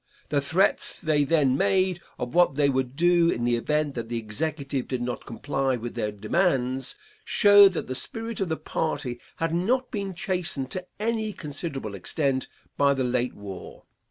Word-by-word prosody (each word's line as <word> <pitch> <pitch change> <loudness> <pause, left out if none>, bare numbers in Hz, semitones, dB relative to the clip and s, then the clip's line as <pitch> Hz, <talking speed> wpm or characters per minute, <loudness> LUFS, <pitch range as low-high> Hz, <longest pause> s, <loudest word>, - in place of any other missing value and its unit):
The 145 -1 +2
threats 170 +7 +2
they 155 -4 +2
then 145 -3 +3
made 190 0 +2 0.2
of 125 -1 -4
what 175 -5 +4
they 145 -1 +3
would 130 -1 -1
do 170 +1 +4
in 120 - -1
the 120 0 +2
event 150 +4 0
that 115 -3 -5
the 120 - -2
executive 135 +4 -3
did 130 - -2
not 120 0 -4
comply 135 +2 -1
with 120 0 -5
their 105 - -2
demands, 130 - 0 0.3
showed 205 -2 +7
that - - -3
the 130 - -4
spirit 225 - -4
of 190 -3 -1
the 160 - -1
party 125 -6 -3 0.2
had 165 0 -1
not 245 +10 +1
been 200 -4 -3
chastened 175 -8 -2
to 185 -1 -4
any 220 -1 -1
considerable 140 - -5
extent 130 - -1 0.3
by 140 0 +4
the 130 - 0
late 125 0 0
war. 100 -2 -9
145 Hz, 175 wpm, -26 LUFS, 125-180 Hz, 0.3 s, showed